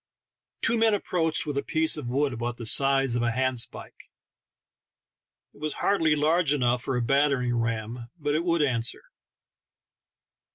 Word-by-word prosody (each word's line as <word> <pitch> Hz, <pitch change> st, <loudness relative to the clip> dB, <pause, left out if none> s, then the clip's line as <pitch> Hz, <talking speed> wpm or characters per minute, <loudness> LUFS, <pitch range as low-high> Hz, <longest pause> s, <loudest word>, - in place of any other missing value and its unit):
Two 230 Hz, 0 st, +2 dB
men 220 Hz, -2 st, +4 dB
approached 165 Hz, -6 st, -1 dB
with 145 Hz, -2 st, -2 dB
a -, -, -2 dB
piece 160 Hz, +1 st, +1 dB
of 150 Hz, -5 st, -6 dB
wood 135 Hz, +2 st, 0 dB
about 120 Hz, +1 st, -4 dB
the 115 Hz, -, -7 dB
size 135 Hz, +1 st, +3 dB
of 120 Hz, -, 0 dB
a 120 Hz, -, +1 dB
handspike. 130 Hz, 0 st, -2 dB, 1.4 s
It -, -, -19 dB
was 155 Hz, -1 st, -2 dB
hardly 160 Hz, -6 st, +2 dB
large 155 Hz, 0 st, +2 dB
enough 125 Hz, -2 st, +1 dB
for 135 Hz, -1 st, -2 dB
a 120 Hz, -, -1 dB
battering 135 Hz, -1 st, +1 dB
ram, 115 Hz, +1 st, -3 dB
but 145 Hz, -2 st, -2 dB
it 155 Hz, +2 st, 0 dB
would 170 Hz, -3 st, +1 dB
answer. 120 Hz, -4 st, 0 dB
135 Hz, 155 wpm, -26 LUFS, 120-155 Hz, 1.4 s, men